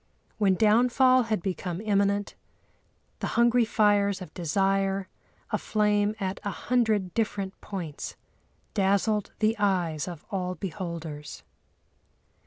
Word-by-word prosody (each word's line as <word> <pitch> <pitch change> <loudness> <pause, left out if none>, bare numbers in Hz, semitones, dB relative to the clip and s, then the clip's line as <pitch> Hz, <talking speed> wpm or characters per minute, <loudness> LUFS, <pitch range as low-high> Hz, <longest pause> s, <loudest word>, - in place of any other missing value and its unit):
When 195 -3 +4
downfall 245 +4 +4
had 215 -6 0
become 180 -2 -3
imminent, 200 -1 +1 0.9
the - - -2
hungry 235 0 +4
fires 205 -3 +2
of 180 -5 -9
desire, 195 +3 0 0.4
aflame 210 0 +1
at 190 -1 -3
a 205 - -2
hundred 215 -4 0
different 205 -3 -2
points, 170 -7 -6 0.6
dazzled 200 +1 +1
the 220 +1 +2
eyes 180 -6 0
of 170 -4 -8
all 185 -2 -2
beholders. 170 -5 -6
200 Hz, 105 wpm, -27 LUFS, 185-215 Hz, 0.9 s, When